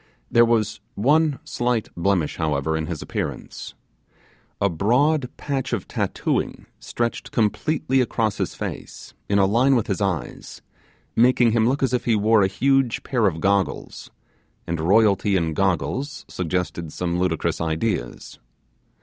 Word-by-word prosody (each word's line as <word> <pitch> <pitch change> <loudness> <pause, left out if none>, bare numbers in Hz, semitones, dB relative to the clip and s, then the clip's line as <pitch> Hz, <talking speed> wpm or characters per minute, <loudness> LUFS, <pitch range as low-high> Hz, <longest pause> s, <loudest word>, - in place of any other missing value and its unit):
There 120 0 +6
was 110 -2 0 0.2
one 145 +6 +3
slight 120 -2 -1
blemish, 85 -3 0
however, 80 0 0
in 80 0 -2
his 85 -3 -5
appearance. - - -5 0.8
A 100 - +3
broad 125 - +1
patch 135 -3 -3
of 105 -6 -2
tattooing - - -2
stretched 115 - -3
completely 130 +4 +1
across 110 -4 -1
his - - -2
face, - - -7 0.2
in 100 - +2
a 100 - +5
line 125 +7 +3
with 115 - +1
his 100 -1 -2
eyes, 90 -10 -4 0.5
making 120 0 +4
him 115 +1 +3
look 135 +2 -1
as 130 - +1
if 125 - 0
he 115 - +3
wore 110 +1 +4
a 95 - +4
huge 135 +2 +1
pair 120 -5 +1
of 80 -3 -2
goggles; 100 0 -1 0.6
and 85 -1 -3
royalty 100 +3 +3
in 85 -3 0
goggles 100 - -1
suggested 85 -2 -3
some 90 +1 -2
ludicrous 90 -3 -1
ideas. 80 - -3
105 Hz, 140 wpm, -23 LUFS, 90-125 Hz, 0.8 s, There